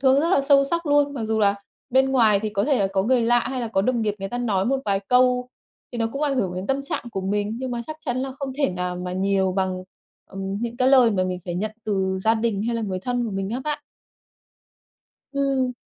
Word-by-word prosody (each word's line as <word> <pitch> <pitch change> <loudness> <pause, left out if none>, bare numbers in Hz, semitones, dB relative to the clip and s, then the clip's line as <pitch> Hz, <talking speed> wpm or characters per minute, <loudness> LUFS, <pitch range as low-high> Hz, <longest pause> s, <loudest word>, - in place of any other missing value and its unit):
thương 270 +1 +4
rất 330 - +1
là 280 - +4
sâu 275 0 +5
sắc 335 +3 -2
luôn. 290 0 +3
Mặc 230 -4 -3
dù 220 0 0
là 200 -1 +4 0.4
bên 265 +1 +3
ngoài 220 -6 +4
thì 215 - -1
có 200 -1 0
thể 280 -3 +2
là 195 - +2
có 190 -1 +2
người 245 +2 +2
lạ, 240 +1 +4
hay 260 0 -3
là 230 - -3
có 195 -3 +1
đồng 240 0 +1
nghiệp 210 -1 0
người 195 0 -4
ta 245 - -4
nói 205 -6 0
một 270 +2 +1
vài 195 -1 +1
câu, 250 0 +3 0.4
thì 240 - -4
nó 225 - +1
cũng 275 - -3
ảnh 280 -3 +1
hưởng 190 -7 0
đến 185 +2 -4
tâm 270 +1 0
trạng 275 - -4
của 195 - -3
mình, 205 +3 -1
nhưng 260 -1 -4
mà 240 -1 -2
chắc 310 - -6
chắn 250 -6 -3
là 265 0 -3
không 275 -2 -4
thể 275 - +2
nào 180 0 -3
mà 180 0 -4
nhiều 190 0 +1
bằng, 185 -1 -1 0.5
ừm, 195 +1 -4
những 235 0 -3
cái 255 0 +3
lời 255 -4 +6
mà 185 -3 +1
mình 185 0 -2
phải 175 -2 -4
nhận 210 +4 -2
từ 190 -2 0
gia 220 +3 +3
đình, 220 -3 -1
hay 235 +1 -1
là 230 - -2
người 190 -3 -2
thân 245 +3 -1
của 225 - -3
mình 195 0 -3
á 245 +3 -2
bạn. 300 0 -2 1.5
Ừm. 275 -2 0
230 Hz, 265 wpm, -23 LUFS, 195-260 Hz, 1.5 s, lời